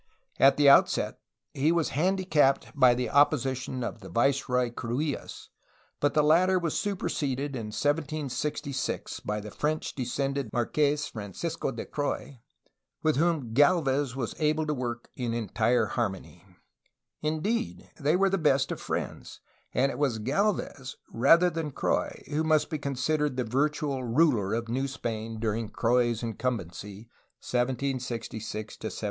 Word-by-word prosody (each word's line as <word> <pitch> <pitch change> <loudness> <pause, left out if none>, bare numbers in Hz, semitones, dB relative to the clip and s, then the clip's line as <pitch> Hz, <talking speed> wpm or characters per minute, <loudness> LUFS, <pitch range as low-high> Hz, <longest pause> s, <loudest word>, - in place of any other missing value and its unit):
At 135 +1 +6
the 145 -1 +5
outset 140 - +5 0.3
he 145 +4 +2
was 170 -2 +1
handi 190 +5 0
capped 145 -6 +2
by 130 -3 +6
the 125 0 -1
opposition 130 -3 +2
of 115 - -4
Viceroy 125 +3 +1
Cruillas, 130 +6 -4 0.5
but 145 - +1
the 150 - +5
latter 180 +5 +4
was 170 -4 -1
superseded 145 -8 -2
in 115 -3 -4
1766 145 +1 -2
by 105 0 -3
the 105 0 -8
French 155 +6 -2
descended 135 -1 -2
Marques 145 +4 +1
(Francisco) 125 - -4
de 115 - -6
Croix, 145 -2 -3 0.6
with 155 -3 +2
whom 155 -8 +1
Gdlvez 145 -3 +3
was 125 -4 -3
able 155 0 +1
to 150 - 0
work 120 -3 -4
in 120 -2 -2
entire 115 +2 +1
harmony; 95 -7 -4 0.8
indeed, 180 +10 -2
they 150 +3 +2
were 195 +1 +3
the 195 - +1
best 140 -4 +2
of - - -4
friends, - - -4 0.3
and 135 +3 +2
it - - -7
was 135 -6 +1
Gdlvez 135 - -1 0.2
rather 170 +9 +5
than 160 -2 -3
Croix 135 - -1
who 150 +2 -1
must 155 -1 +2
be 155 - -2
considered 140 +1 -1
the 125 - +1
virtual 140 +2 0
ruler 115 -5 +2
of 115 0 -3
New 130 +4 -1
Spain 115 -4 -4
during 110 0 -1
Croix's 120 -1 +1
incumbency, 105 -4 -4 0.4
1766 125 -3 -2 0.3
to 110 - -5
1771. - - -6
135 Hz, 140 wpm, -28 LUFS, 120-150 Hz, 0.8 s, At